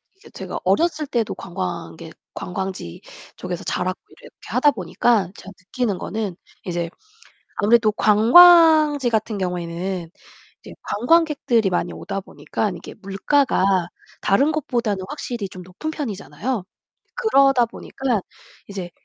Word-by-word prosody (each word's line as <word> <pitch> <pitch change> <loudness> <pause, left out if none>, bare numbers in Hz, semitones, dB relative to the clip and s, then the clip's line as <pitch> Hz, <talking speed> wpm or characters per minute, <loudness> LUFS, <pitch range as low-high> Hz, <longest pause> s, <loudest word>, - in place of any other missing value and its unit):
이게 415 +3 -18
제가 - - -6
어렸을 315 -3 +1
때도 235 -5 -1
관광객 170 -3 -6 0.2
관광지 180 - -5 0.3
쪽에서 175 -1 -5
자랐고 185 +1 -2
이렇게 - - -17
하다 295 - +3
보니까 195 -1 +1
제가 195 - -11
느끼는 200 +2 -2
거는 210 -2 -4 0.3
이제 175 -2 -2 0.7
아무래도 220 +1 +4
관광지 300 +6 +6
같은 220 -1 -1
경우에는 180 -1 -3 0.5
이제 - - -11
관광객들이 255 - +2
많이 180 - -1
오다 195 - -5
보니깐 200 0 -4
이게 - - -10
물가가 195 - +1 0.3
다른 275 +10 +3
곳보다는 235 -10 -2
확실히 240 -8 -5
좀 185 -1 -10
높은 185 - -6
편이잖아요. 215 - -4 0.5
그러다 275 - +4
보니까 240 -1 -3 0.5
이제 190 -3 -6
210 Hz, 300 characters per minute, -22 LUFS, 185-270 Hz, 0.7 s, 관광지